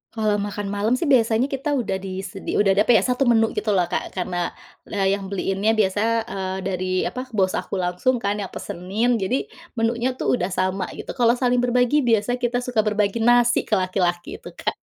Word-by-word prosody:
Kalau 210 Hz, -2 st, +1 dB
makan 205 Hz, 0 st, -4 dB
malam 205 Hz, +4 st, 0 dB
sih 295 Hz, -, -3 dB
biasanya 250 Hz, -2 st, +3 dB
kita 275 Hz, +2 st, -1 dB
udah 195 Hz, -7 st, -1 dB
disedi 190 Hz, 0 st, -5 dB
udah 200 Hz, -1 st, +4 dB
ada 205 Hz, +2 st, +2 dB
apa 240 Hz, -, +6 dB
ya, -, -, +4 dB
1 250 Hz, +1 st, +1 dB
menu 225 Hz, -2 st, +4 dB
gitu 210 Hz, -1 st, -1 dB
loh 180 Hz, -, +3 dB
Kak, -, -, -3 dB
karena, 175 Hz, -1 st, -2 dB, 0.3 s
eee, 195 Hz, -1 st, 0 dB
yang 195 Hz, -, -7 dB
beliinnya 195 Hz, +3 st, 0 dB
biasa, 205 Hz, -2 st, +1 dB, 0.3 s
eee, 190 Hz, -1 st, -3 dB
dari 185 Hz, -1 st, -2 dB
apa 255 Hz, +1 st, -4 dB
bos 190 Hz, -2 st, +2 dB
aku -, -, -3 dB
langsung 185 Hz, +8 st, 0 dB
kan 205 Hz, -3 st, -2 dB
yang 195 Hz, -, -3 dB
pesenin, 205 Hz, +7 st, -2 dB
jadi, 260 Hz, -, -2 dB, 0.2 s
menunya 235 Hz, +2 st, 0 dB
tuh 250 Hz, -, 0 dB
udah 180 Hz, -, 0 dB
sama, 185 Hz, 0 st, -1 dB
gitu. -, -, -6 dB
Kalau 240 Hz, -1 st, +3 dB
saling 250 Hz, 0 st, +1 dB
berbagi, 245 Hz, +3 st, +2 dB
biasanya 230 Hz, +2 st, +2 dB
kita 245 Hz, 0 st, -1 dB
suka 250 Hz, -3 st, -1 dB
berbagi 210 Hz, +1 st, 0 dB
nasi 240 Hz, +1 st, +3 dB
ke 215 Hz, -, +2 dB
laki-laki 185 Hz, -2 st, -1 dB
itu, -, -, -12 dB
Kak. -, -, -3 dB
210 Hz, 195 wpm, -22 LUFS, 190-245 Hz, 0.3 s, apa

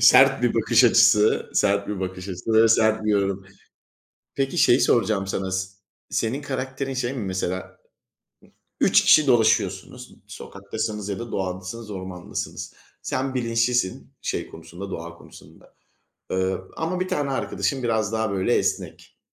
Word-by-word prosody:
Sert -, -, +6 dB
bir -, -, +2 dB
bakış -, -, +4 dB
açısı, 105 Hz, +1 st, +4 dB
sert 100 Hz, 0 st, +2 dB
bir 105 Hz, -2 st, -4 dB
bakış 95 Hz, 0 st, -5 dB
açısı 95 Hz, +4 st, -4 dB
ve 110 Hz, +1 st, +6 dB
sert 110 Hz, -1 st, +3 dB
bir 105 Hz, -, +1 dB
yorum. 100 Hz, -2 st, 0 dB, 0.9 s
Peki 135 Hz, +5 st, -1 dB
şeyi 125 Hz, -5 st, +5 dB
soracağım 110 Hz, -4 st, +2 dB
sana, 95 Hz, -1 st, -3 dB
s 95 Hz, 0 st, -1 dB, 0.4 s
senin 120 Hz, +5 st, -1 dB
karakterin 135 Hz, -1 st, -4 dB
şey 130 Hz, 0 st, -2 dB
mi 125 Hz, -5 st, -4 dB
mesela? 95 Hz, -1 st, -4 dB, 1.0 s
3 -, -, +5 dB
kişi 155 Hz, -1 st, +6 dB
dolaşıyorsunuz, 110 Hz, 0 st, +1 dB
sokaktasınız 105 Hz, +1 st, -6 dB
ya 100 Hz, -2 st, -3 dB
da 120 Hz, -1 st, -7 dB
doğadasınız, 95 Hz, +4 st, -4 dB
ormandasınız. 95 Hz, -2 st, -6 dB, 0.3 s
Sen 130 Hz, 0 st, -2 dB
bilinçlisin, 115 Hz, -4 st, 0 dB
şey -, -, -3 dB
konusunda, 95 Hz, +3 st, -10 dB
doğa 85 Hz, +1 st, -6 dB
konusunda, -, -, -17 dB, 0.6 s
eee, 95 Hz, 0 st, 0 dB, 0.2 s
ama 175 Hz, +3 st, -2 dB
bir 185 Hz, -, -1 dB
tane 145 Hz, -5 st, -1 dB
arkadaşın 135 Hz, 0 st, -2 dB
biraz 110 Hz, -3 st, 0 dB
daha 110 Hz, -1 st, 0 dB
böyle 95 Hz, -1 st, +1 dB
esnek. -, -, -3 dB
110 Hz, 140 wpm, -24 LUFS, 95-125 Hz, 1.0 s, Sert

